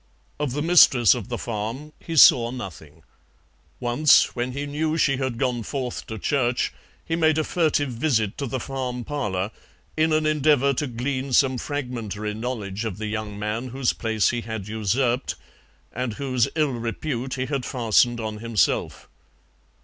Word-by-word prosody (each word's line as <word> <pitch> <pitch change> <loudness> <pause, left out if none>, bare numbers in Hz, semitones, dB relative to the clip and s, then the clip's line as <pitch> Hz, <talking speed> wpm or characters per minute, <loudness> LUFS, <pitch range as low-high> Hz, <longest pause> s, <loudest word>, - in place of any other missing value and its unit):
Of 145 -4 -1
the 145 +2 -2
mistress 135 - +6
of 120 -1 -6
the 120 - -2
farm 115 +8 -5
he 165 - -6
saw 120 -4 +7
nothing. 120 - -9 0.8
Once, 125 +5 +4
when 125 +1 -2
he 140 +2 -3
knew 155 +2 -1
she 140 -4 +2
had 130 -3 -2
gone 125 -1 0
forth 125 +1 -4
to 110 - -5
church, 125 +1 0 0.3
he 165 - -1
made 160 -2 +3
a 155 - +2
furtive 150 -5 +1
visit 115 -5 0
to 140 - -2
the 130 +2 -3
farm 125 -2 -4
parlour 105 -8 -2 0.4
in 155 +1 +2
an 155 0 +2
endeavour 145 -2 +3
to 145 +3 -2
glean 130 +2 -3
some 130 -1 +3
fragmentary 115 -8 -4
knowledge 110 -3 -4
of 110 -5 -4
the 110 - -4
young 105 -1 -4
man 105 +4 -3
whose 130 0 0
place 110 -2 +1
he 120 -1 -2
had 110 -4 -6
usurped, 120 +4 0 0.6
and 125 -2 -3
whose 130 -1 0
ill 155 -3 +2
repute 120 +2 -3
he 130 -1 -2
had 135 -1 -2
fastened 120 -1 +2
on 110 -1 -4
himself. 115 -2 0
125 Hz, 165 wpm, -24 LUFS, 115-140 Hz, 0.8 s, saw